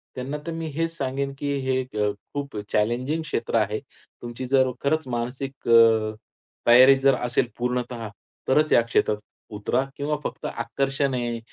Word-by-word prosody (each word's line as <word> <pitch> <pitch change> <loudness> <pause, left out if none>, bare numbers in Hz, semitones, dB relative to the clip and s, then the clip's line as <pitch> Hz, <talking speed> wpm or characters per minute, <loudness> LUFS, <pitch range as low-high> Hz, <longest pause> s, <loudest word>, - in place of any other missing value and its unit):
त्यांना 135 +4 -4
तर - - -2
मी 165 0 -4
हेच 165 +1 -1
सांगेन, 135 +1 -2
की 145 0 -2
हे 130 0 0
अ, 105 -5 -1 0.2
खूप 140 -5 -4
चॅलेंजिंग 125 +9 0
क्षेत्र 115 -7 -3
आहे. 105 0 0 0.4
तुमची 120 +2 -6
जर 130 -1 +4
खरंच 155 0 0
मानसिक 125 +3 -4
अ, 115 -2 +5 0.5
तयारी 130 +3 +8
जर 135 -1 +4
असेल 125 0 0
पूर्णतः 125 -2 -2 0.4
तरच 150 +3 +3
या 120 - +7
क्षेत्रात 115 -2 +1 0.4
उतरा 105 +5 0
किंवा 145 +1 -1
फक्त - - -5
आकर्षण 135 +4 -1
आहे, 120 -2 -2
130 Hz, 150 wpm, -24 LUFS, 115-140 Hz, 0.5 s, तयारी